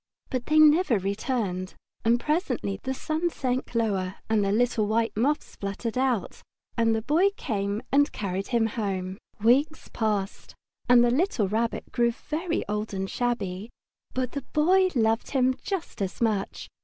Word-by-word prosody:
But 255 -2 -2
they 310 - +3
never 310 - +6
returned, 195 -1 -2 0.3
and 235 +1 +3
presently 255 - -1
the 260 - -3
sun 315 +5 -1
sank 255 -5 -3
lower 195 -5 0 0.2
and 215 -2 +3
the 195 - +1
little 225 -1 +2
white 225 +2 0
moths 280 +8 0
fluttered 200 +3 -4
out, 255 -5 0 0.3
and 230 -1 +2
the 220 - -2
Boy 330 - +3
came 205 -2 -2
and 285 +1 +4
carried 195 -1 -3
him 235 -2 +2
home. 195 -4 -3 0.2
Weeks 275 +8 +2
passed, 210 -3 -2 0.3
and 245 -1 +7
the 240 - +3
little 260 - +1
Rabbit 225 +4 -2
grew 235 -1 +2
very 325 +7 -3
old 210 0 -3
and 190 0 -2
shabby, 220 -4 -2 0.5
but 255 -1 -1
the 280 - -4
Boy 370 +5 +4
loved 225 -1 +1
him 260 -2 +2
just 380 - -4
as 190 -1 -3
much. 215 -4 -1
230 Hz, 155 wpm, -26 LUFS, 205-270 Hz, 0.5 s, and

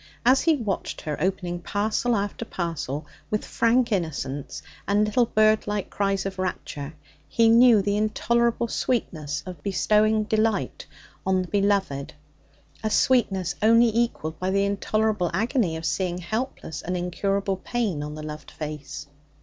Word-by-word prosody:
As 260 +2 +5
he 325 -2 +4
watched 215 -8 -3
her 150 -1 -3
opening 180 -1 -1
parcel 215 +6 0
after 205 +2 -2
parcel 165 - -4 0.2
with 210 - -1
frank 235 +1 +2
innocence 145 -7 -3 0.2
and 205 +1 +3
little 230 +3 +2
bird 215 0 +3
like 205 -1 -2
cries 195 -1 0
of 190 -1 -4
rapture, 155 -5 -4 0.3
he 230 -1 +4
knew 230 -2 +7
the 205 +1 +1
intolerable 235 +2 +1
sweetness 155 - -2
of 180 -5 -8
bestowing 215 +3 +2
delight 215 -1 0 0.4
on 190 -1 +1
the - - -8
beloved 195 -8 0 0.7
a 215 - +1
sweetness 195 -8 +2
only 230 +1 +5
equalled 195 -9 -1
by 185 - -1
the 200 +1 +2
intolerable 205 -1 0
agony 220 - +1
of 160 - -6
seeing 180 -1 -1
helpless 200 - -4
and 180 +1 -2
incurable 195 +2 -1
pain 205 -6 -2
on 150 0 -5
the 155 - -7
loved 150 0 -7
face. 150 -1 -6
200 Hz, 145 wpm, -25 LUFS, 175-220 Hz, 0.7 s, knew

